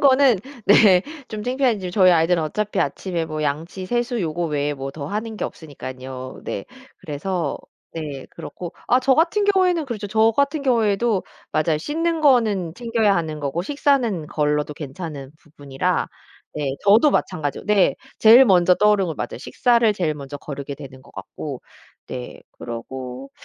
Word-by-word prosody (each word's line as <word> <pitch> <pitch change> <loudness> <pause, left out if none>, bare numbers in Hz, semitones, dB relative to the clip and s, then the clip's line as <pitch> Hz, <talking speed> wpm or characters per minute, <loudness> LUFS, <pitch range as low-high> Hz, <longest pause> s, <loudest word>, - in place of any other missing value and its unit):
거는 270 -4 +5 0.3
네 195 -3 +6 0.3
좀 215 -1 -5
창피하지만 245 -7 0
저희 185 -1 +5
아이들은 165 +1 +3
어차피 200 +5 -2
아침에 170 +2 -2
뭐 155 -1 -4
양치, 160 +6 -3
세수 240 +1 -1
요거 170 -1 -2
외에 145 -1 -1
뭐 135 0 -5
더 140 0 -7
하는 215 +5 -4
게 - - -3
없으니깐요. 130 -4 -8
네. - - -4 0.3
그래서 155 +1 -3 0.3
네 150 -5 -6
그렇고 175 -2 -8 0.2
아 250 - +4
저 265 +1 +3
같은 345 +7 +2
경우에는 370 -5 +3
그렇죠. 215 -4 -4
저 220 +2 +3
같은 280 +1 +1
경우에도 225 -4 +1 0.3
맞아요. 155 0 +1
씻는 325 - -1
거는 215 - +3
챙겨야 230 -4 +1
하는 160 -2 -2
거고 145 +4 -2
식사는 255 - +1
걸러도 150 -1 -1
괜찮은 145 -2 -7
부분이라 145 -4 -3 0.5
네 145 -2 -2
저도 220 +9 +6
마찬가지고 155 - -2
네 210 -2 +3 0.2
제일 230 +4 +8
먼저 180 -4 +5
떠오르는 210 -1 +3
거 160 - -3
맞아요. - - -5
식사를 235 -3 +2
제일 170 -6 -1
먼저 145 0 -7
거르게 140 -1 -7
되는 135 -2 -11
거 - - -18
같고 125 +7 -7 0.5
네 125 -1 -7 0.2
그러고 125 +3 -7
180 Hz, 340 characters per minute, -22 LUFS, 150-230 Hz, 0.5 s, 제일